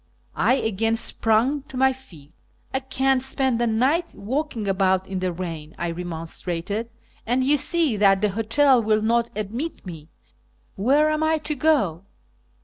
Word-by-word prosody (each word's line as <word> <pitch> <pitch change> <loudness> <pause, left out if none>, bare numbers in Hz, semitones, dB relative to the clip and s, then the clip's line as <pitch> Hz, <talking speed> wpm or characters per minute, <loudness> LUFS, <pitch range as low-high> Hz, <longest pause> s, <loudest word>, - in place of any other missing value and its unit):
I 255 - +3
again 225 -1 0
sprang 230 +5 +1
to 260 - -8
my 265 0 +3
feet. 165 - -17 0.2
" - - -36
I 265 - +1
can't 265 0 0
spend 265 -2 +1
the 240 - +2
night 265 +10 +1
walking 240 -1 -3
about 190 -1 +1
in 190 -1 -4
the 185 0 -1
rain," 165 -3 -7
I 170 - -2
remonstrated, 175 +5 -4 0.2
" - - -34
and 250 +3 +1
you 285 +3 +3
see 295 -3 +1
that 195 -1 +4
the 210 +1 +1
hotel 235 +6 +3
will 215 -1 +1
not 235 +1 +1
admit 225 +10 -5
me. 160 -4 -9 0.7
Where 285 +9 +3
am 310 0 -1
I 315 0 +2
to 305 0 -3
go 255 - +1
225 Hz, 165 wpm, -23 LUFS, 190-265 Hz, 0.7 s, that